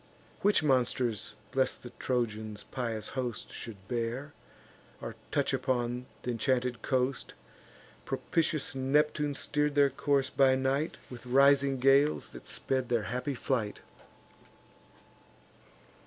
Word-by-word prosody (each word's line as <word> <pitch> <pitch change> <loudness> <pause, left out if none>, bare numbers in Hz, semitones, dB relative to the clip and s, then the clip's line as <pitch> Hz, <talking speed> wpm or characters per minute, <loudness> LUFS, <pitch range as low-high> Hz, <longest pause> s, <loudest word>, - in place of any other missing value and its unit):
Which 205 -5 +4
monsters 125 -6 +1 0.2
lest 130 -1 +1
the 120 - -8
Trojans' 110 -4 -2
pious 115 -4 -3
host 125 -4 -4
Should 100 -4 -8
bear, 120 +5 -3 0.7
or 115 -1 -6
touch 145 -2 +1
upon 125 -1 -1 0.2
th' - - -9
inchanted 125 0 0
coast, 130 0 -1 0.7
Propitious 160 -3 -1
Neptune 145 +2 +1
steer'd 150 +1 0
their 140 -1 +5
course 140 0 +1
by 135 -1 +5
night 135 +4 0
With 125 0 -9
rising 140 +1 +5
gales 135 +3 +4
that - - -11
sped 130 -2 -1
their 120 -3 +2
happy 125 +3 -2
flight. 115 -5 -1
130 Hz, 110 wpm, -31 LUFS, 120-140 Hz, 0.7 s, their